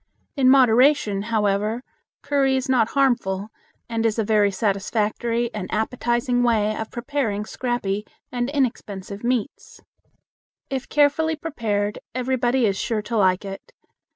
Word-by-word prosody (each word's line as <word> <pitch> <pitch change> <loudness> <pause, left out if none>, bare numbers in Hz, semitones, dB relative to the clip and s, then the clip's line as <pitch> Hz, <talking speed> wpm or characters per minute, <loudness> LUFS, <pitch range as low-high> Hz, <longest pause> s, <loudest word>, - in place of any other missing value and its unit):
In 265 -3 +4
moderation, 250 -4 +4
however, 215 +1 0 0.4
curry 275 -2 +2
is 260 +2 -2
not 245 -4 +3
harmful, 215 -7 +1 0.4
and 230 -1 -2
is 225 -1 +1
a 225 - +1
very 210 -1 +3
satisfactory 215 +4 -1
and 205 -3 -5
appetizing 240 +2 0
way 215 -3 +2
of 220 0 -5
preparing 240 -5 -2
scrappy 215 -5 -2 0.2
and 245 0 -1
inexpensive 210 -7 -3
meats. 250 +3 -3 0.9
If 265 -1 -3
carefully 305 +2 +2
prepared, 215 -10 -2 0.2
everybody 255 -1 +1
is 195 -2 +1
sure 220 -3 -1
to 230 +2 -2
like 185 -1 +2
it. 195 0 -9
230 Hz, 125 wpm, -23 LUFS, 210-255 Hz, 0.9 s, In